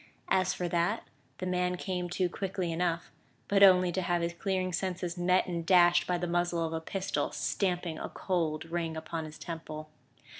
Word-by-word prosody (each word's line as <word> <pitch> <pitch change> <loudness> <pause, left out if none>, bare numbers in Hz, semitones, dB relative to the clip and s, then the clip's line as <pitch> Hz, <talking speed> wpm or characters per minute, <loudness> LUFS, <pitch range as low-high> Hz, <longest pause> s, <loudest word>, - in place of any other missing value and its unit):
As 190 -1 +3
for 180 - -2
that, 175 +6 0 0.3
the 185 - -4
man 180 0 0
came 180 -1 -3
to 180 +1 +1
quickly 185 -1 -3
enough; 170 0 -1 0.4
but 200 0 +3
only 185 -2 +7
to 185 - -1
have 175 -1 0
his 170 0 -1
clearing 185 0 -1
senses 180 -1 -2
met 180 +1 +3
and 170 -2 -3
dashed 175 0 +5
by 180 - +1
the 175 - -2
muzzle 175 -1 0
of 160 - -4
a 160 - -2
pistol 195 +3 -2
stamping 180 -4 -1
a - - -4
cold 160 -5 -1
ring 165 -1 -3
upon 160 0 -4
his 155 0 -9
temple. 155 -2 -7
175 Hz, 185 wpm, -30 LUFS, 170-185 Hz, 0.4 s, only